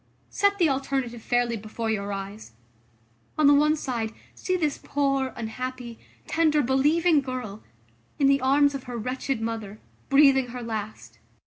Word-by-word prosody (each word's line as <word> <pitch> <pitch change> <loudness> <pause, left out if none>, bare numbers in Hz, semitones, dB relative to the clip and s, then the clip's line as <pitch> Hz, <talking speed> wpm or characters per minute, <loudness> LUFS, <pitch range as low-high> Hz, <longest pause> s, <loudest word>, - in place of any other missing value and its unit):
Set 400 0 +2
the 345 -4 +4
alternative 270 -4 -2
fairly 240 0 0
before 220 +1 -4
your 200 -1 -2
eyes. 195 - -7 0.8
On 310 - +3
the 285 - +7
one 300 +2 +4
side, 240 -7 -3 0.2
see 370 - -2
this 305 -5 -1
poor, 275 -2 0
unhappy, 240 +1 -6 0.3
tender, 310 -2 +2
believing 295 +5 +3
girl, 250 -6 -6 0.6
in 280 - +2
the 275 0 +4
arms 285 +2 +3
of 275 -2 -6
her 245 -1 -6
wretched 255 +2 -3
mother, 220 -2 -5 0.3
breathing 275 -2 +5
her 245 0 -7
last. 215 -2 -6
260 Hz, 145 wpm, -25 LUFS, 225-285 Hz, 0.8 s, the